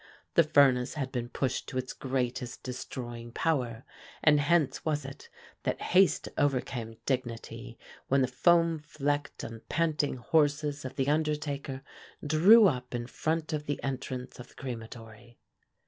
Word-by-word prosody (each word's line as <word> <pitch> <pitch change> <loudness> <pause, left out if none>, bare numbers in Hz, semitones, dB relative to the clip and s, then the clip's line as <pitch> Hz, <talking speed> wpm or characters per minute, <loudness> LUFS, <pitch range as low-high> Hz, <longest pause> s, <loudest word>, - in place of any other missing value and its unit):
The 170 - +7
furnace 140 -4 +4
had 135 -3 -3
been 120 -2 -3
pushed 130 +1 -2
to 130 - -5
its 130 0 -3
greatest 125 -2 -3
destroying 120 -2 -6
power, 125 -9 -1 0.4
and 150 -1 +6
hence 145 -2 +2
was 150 -3 -1
it 135 0 -10 0.3
that - - -2
haste 190 +1 +3
overcame 125 -5 -1
dignity 120 -2 -4 0.3
when 135 0 +3
the - - +2
foam 165 +5 +3
flecked 145 -1 -3
and 115 -1 -7
panting 155 -5 0
horses 145 +1 +1
of 130 - -6
the 135 - 0
undertaker 145 -3 -1 0.4
drew 185 +10 +7
up 125 -6 -2
in 120 0 -3
front 160 +5 -2
of 150 -1 -3
the 145 - -1
entrance 130 -2 -4
of 125 - -9
the - - -21
crematory. 115 -2 -9
135 Hz, 145 wpm, -30 LUFS, 125-150 Hz, 0.4 s, The